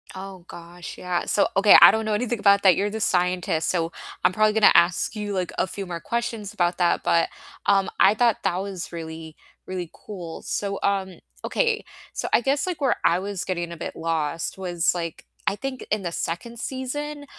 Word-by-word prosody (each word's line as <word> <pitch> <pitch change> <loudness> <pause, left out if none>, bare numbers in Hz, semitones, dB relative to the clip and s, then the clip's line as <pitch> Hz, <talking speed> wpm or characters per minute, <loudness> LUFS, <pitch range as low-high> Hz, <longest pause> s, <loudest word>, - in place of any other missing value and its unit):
Oh, 190 -2 -9
gosh, 175 +1 -10
yeah, 180 -1 -2
so, 205 - +2
okay, 200 +1 +8
I - - +11
don't 220 0 -1
know 215 - 0
anything 235 +1 -1
about 200 0 +4
that, 190 -2 +7
you're 205 +1 +1
the 220 +1 -5
scientist, 180 -3 +1
so, 165 -2 0 0.3
I'm 180 - +5
probably 215 +2 +3
gonna 215 - +7
ask 175 +5 +3
you, 210 -1 -4
like, 185 -2 -2
a - - +1
few 195 +2 -6
more 170 -2 -5
questions 230 -2 -3
about 175 -3 0
that, 175 -1 +2
but, 170 - +2 0.4
um, 195 -1 +3
I 195 - +6
thought 235 -1 +2
that 175 - +1
was 190 -2 -5
really, 160 -1 -7 0.3
really 180 -3 -5
cool, 175 -6 -8
so, 200 -1 -3
um 195 -2 -1 0.3
okay, 460 -3 0 0.3
so, - - -3
I - - +5
guess, 275 +5 +1
like, 360 -4 -3
where 265 -3 +3
I 175 - +4
was 195 -1 -4
getting 175 -2 -3
a 170 - -7
bit - - -6
lost 165 +1 -2
was, 175 -2 0
like, 165 -2 -5 0.2
I 195 - +1
think 260 +3 -5
in 215 -1 +1
the 175 - -3
2nd 225 +9 -4
season 290 +3 -4
190 Hz, 200 wpm, -24 LUFS, 175-215 Hz, 0.4 s, I